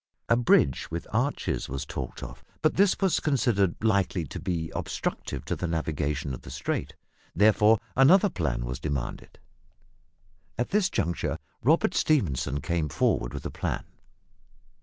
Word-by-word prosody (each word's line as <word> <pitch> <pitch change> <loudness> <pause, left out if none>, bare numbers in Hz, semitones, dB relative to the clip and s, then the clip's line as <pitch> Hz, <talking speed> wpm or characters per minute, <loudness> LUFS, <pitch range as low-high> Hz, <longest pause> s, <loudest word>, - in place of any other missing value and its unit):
A 115 - +6
bridge 115 - +3
with 85 +1 -4
arches 125 +6 -1
was 70 +2 -4
talked 65 -3 -6
of, 65 +4 -9 0.2
but 155 - +3
this 200 0 +3
was 190 -3 +2
considered 115 - +1
likely 100 -6 +1
to - - -6
be 85 -4 -3
obstructive - - -4
to - - -1
the 90 - -3
navigation 75 -3 -2
of 65 - -7
the - - -11
strait, - - -3 0.4
therefore 105 +2 +5 0.2
another 175 +10 +6
plan 65 -8 -2
was 60 +1 -4
demanded. 70 -5 -4 1.2
At 120 - -1
this 200 -2 +3
juncture 85 - -1 0.2
Robert 160 - +3
Stephenson 75 - +1
came 80 0 -1
forward - - +1
with - - -7
a - - -3
plan. - - -3
90 Hz, 145 wpm, -27 LUFS, -, 1.2 s, A